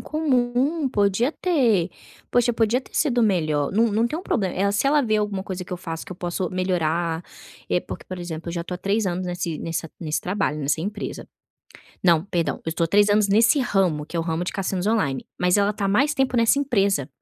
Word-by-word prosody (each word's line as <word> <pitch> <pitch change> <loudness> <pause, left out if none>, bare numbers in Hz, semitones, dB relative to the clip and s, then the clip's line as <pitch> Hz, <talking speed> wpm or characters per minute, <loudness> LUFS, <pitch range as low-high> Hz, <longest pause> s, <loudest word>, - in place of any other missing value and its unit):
comum. 275 0 0
Podia 210 +4 +1
ter 240 - +2 0.4
poxa, 245 0 +3
podia 230 +2 +2
ter - - -20
sido 245 -6 +2
melhor. 155 -8 +1
Não 225 +4 +3
não 220 +3 +2
tem 305 +7 -3
um - - -7
problema 195 - -1
eh, 200 +2 +1
se 205 +6 +1
ela 295 +2 +4
ver 215 -4 +1
alguma 205 -2 -2
coisa 185 -2 -5
que - - -9
eu - - -2
faço, 165 -3 -6
que - - -8
eu - - -11
posso 175 0 -2
melhorar, 170 -2 0 0.5
eh, 180 - +2
porque, - - -8
por 185 - -6
exemplo, 170 -1 -6
eu - - -3
já 170 -1 -3
tô 180 - -5
há - - -6
3 200 +3 0
anos 180 0 -2
nesse 175 -2 -3
nessa 165 -1 -4
nesse 155 -3 -1
trabalho, 185 -5 -1
nessa 145 +1 0
empresa. 205 +4 -5 0.8
Não, 170 -3 +4
perdão, 175 -4 -1
eu - - -3
estou 165 +1 0
há - - +1
3 205 +4 +5 0.2
nesse 220 +7 +4
ramo, 185 - +1
que 170 - -6
é - - +1
o - - -1
ramo 165 +1 -2
de - - -3
cassinos 190 -1 -2
online, 160 - 0
mas 180 +1 +3
ela 205 0 +2
tá 210 -1 -4
há - - 0
mais 275 +9 +2
tempo 265 -2 +1
nessa 230 +3 +4
empresa. 200 - +1
195 Hz, 225 wpm, -23 LUFS, 170-230 Hz, 0.8 s, 3